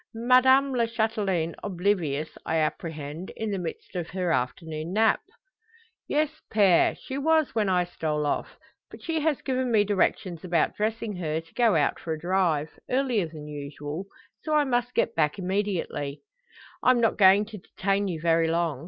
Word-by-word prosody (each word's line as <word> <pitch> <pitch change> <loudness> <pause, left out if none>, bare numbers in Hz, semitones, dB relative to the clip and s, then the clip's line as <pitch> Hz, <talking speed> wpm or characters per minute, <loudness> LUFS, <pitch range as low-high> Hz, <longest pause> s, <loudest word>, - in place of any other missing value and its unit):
Madame 260 +3 +4
la 235 -2 +1
Chatelaine 210 -7 -1
oblivious, 175 -6 0
I 160 - -2
apprehend; 155 +1 -3
in 220 -1 -2
the 195 - -2
midst 170 +2 -7
of 175 -2 -3
her 180 -2 -1
afternoon 155 +5 -2
nap?" 220 +1 +3 0.9
"Yes, 305 +1 -1
Pere; 195 -5 +4
she 265 +1 -6
was 315 0 +2
when 215 -3 +1
I 180 -1 +3
stole 155 -4 -2
off. 145 - -2 0.3
But - - -13
she 325 -1 -1
has 305 -2 0
given 260 -2 -1
me 215 -2 +5
directions 190 -4 0
about 175 -3 +1
dressing 215 -1 -2
her, 160 -3 -1
to 165 0 -15
go 230 -6 +3
out 145 -3 +1
for 160 - -3
a 155 - -5
drive 170 -4 0
earlier 250 -8 +1
than 155 -2 -10
usual. 145 +4 -6 0.3
So 310 0 -1
I 300 - +5
must 245 -2 -1
get - - +1
back 150 -2 +1
immediately." 185 -7 -2 0.6
"I'm 255 -1 +4
not 225 -1 +2
going 195 +1 +6
to 215 -1 -9
detain 195 +2 -1
you 170 -4 -3
very 165 0 +3
long. 165 -4 0
190 Hz, 170 wpm, -26 LUFS, 160-225 Hz, 0.9 s, going